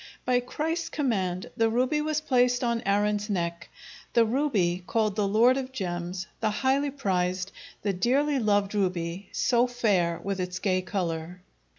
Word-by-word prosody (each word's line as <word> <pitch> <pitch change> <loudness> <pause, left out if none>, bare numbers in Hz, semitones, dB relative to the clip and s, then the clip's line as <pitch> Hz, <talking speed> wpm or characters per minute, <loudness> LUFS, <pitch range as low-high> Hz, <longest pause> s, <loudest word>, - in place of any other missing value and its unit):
By 250 0 +3
Christ's 320 +7 -3
command 190 - -1
the 225 0 +2
ruby 255 +6 +1
was 305 0 -1
placed 250 -3 +2
on 235 -1 0
Aaron's 205 +1 +1
neck, 170 -3 -2 0.4
"the 235 -1 +5
ruby, 215 -9 +1
called 215 -3 +1
the 210 -2 +1
lord 235 +6 +4
of 265 -1 -4
gems; 180 -4 -4
the 220 - +1
highly 270 +6 +1
prized, 185 -7 -1 0.3
the 200 -1 +1
dearly 270 +9 +2
loved 205 -3 +1
ruby, 185 -2 -2
so 245 0 +2
fair 200 -9 +1
with 195 0 -2
its 180 0 -3
gay 185 -2 +1
color." 180 -2 -4
210 Hz, 155 wpm, -27 LUFS, 185-250 Hz, 0.4 s, the